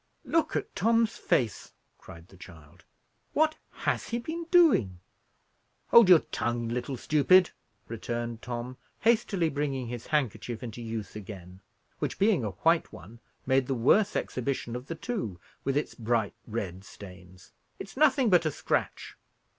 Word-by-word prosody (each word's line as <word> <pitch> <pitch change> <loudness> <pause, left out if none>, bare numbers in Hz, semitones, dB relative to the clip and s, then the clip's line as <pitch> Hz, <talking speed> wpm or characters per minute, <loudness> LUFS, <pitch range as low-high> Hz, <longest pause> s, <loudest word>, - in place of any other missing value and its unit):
"Look 325 -1 +1
at - - -3
Tom's 230 +2 +2
face!" 115 -6 -1 0.3
cried 85 +1 -13
the - - -17
child. 85 -2 -15 0.5
"What 310 +1 +2
has - - -2
he 235 - -1
been 320 +8 -5
doing?" 280 - +4 0.9
"Hold 235 -5 +7
your 175 -4 +8
tongue, 120 -1 -2
little 125 +2 -3
stupid," 175 +7 +4 0.4
returned 120 0 -4
Tom, 125 +1 -6 0.2
hastily 215 -6 +2
bringing 140 -4 -2
his 120 -1 -7
handkerchief 125 -5 -2
into 120 0 -7
use 110 -4 -6
again; 95 -3 -10 0.4
which, - - -3
being 200 - +3
a 105 - -1 0.2
white 165 0 +3
one, 105 +8 -13 0.3
made 130 -1 +2
the 135 - -1
worse 195 - +3
exhibition 125 -2 -3
of 125 +2 -7
the 165 - -4
two, 160 - -4 0.2
with 135 0 0
its 150 - -2
bright 115 -2 -1
red 95 -5 -5
stains. 90 -2 -14 0.3
"It's 195 - -9
nothing 265 -5 +3
but 170 -3 +4
a - - 0
scratch." - - -2
125 Hz, 145 wpm, -28 LUFS, -, 0.9 s, your